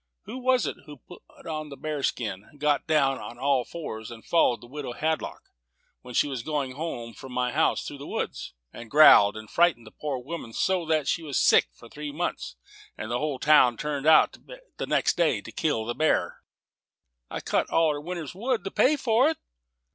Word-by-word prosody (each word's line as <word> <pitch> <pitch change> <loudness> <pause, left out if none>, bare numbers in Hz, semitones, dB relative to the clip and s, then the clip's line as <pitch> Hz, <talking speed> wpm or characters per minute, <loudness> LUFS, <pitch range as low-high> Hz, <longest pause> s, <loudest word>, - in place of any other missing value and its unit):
Who 255 - -7
was 255 0 +2
it - - -4 0.3
put 175 - -12 0.2
on 155 -2 -5
a - - -7
bear 150 +1 -4
skin, 105 -1 -3
got 145 0 0
down 140 -4 +2
on 120 - -9
all 135 0 +1
fours, 110 -9 -7
followed 165 -8 +2
the - - -12
widow 135 0 -6
Hadlock 160 +4 -3 0.5
when 125 -1 -10
she - - +3
was 135 -4 -4
going 145 -1 -2
home 130 -5 -5
from 130 - -11
my 125 0 0
house 155 +4 +1
through 145 - -7
the 140 - -8
woods, - - -4 0.2
and 115 -1 -10
growled, 110 -8 +7
and 110 0 -9
frightened 170 -5 +2
the 110 - -12
poor 145 -3 -4
woman 125 -2 -7
so 180 +2 0
that 155 -3 +1
she 165 - 0
was 145 -4 -3
sick - - +5
for 65 - -16
three 150 +4 -7
months, 175 +5 -4 0.4
and 110 - -6
the 120 - 0
whole 150 -2 -2
town 130 -4 +5
turned 150 +1 -3
out 160 - +6 0.4
the - - -4
next - - +1
day - - +2
to - - -11
kill 145 -9 -1
the 120 - -2
bear?" 155 +5 0 0.9
"I - - -4
cut - - -1
all 165 -1 +3
her 145 - -6
winter's 170 -2 -6
wood, 235 +5 -2
to 195 - -5
pay 295 +4 +3
for 255 0 +3
it." 320 - -3
150 Hz, 200 wpm, -26 LUFS, 125-160 Hz, 0.9 s, growled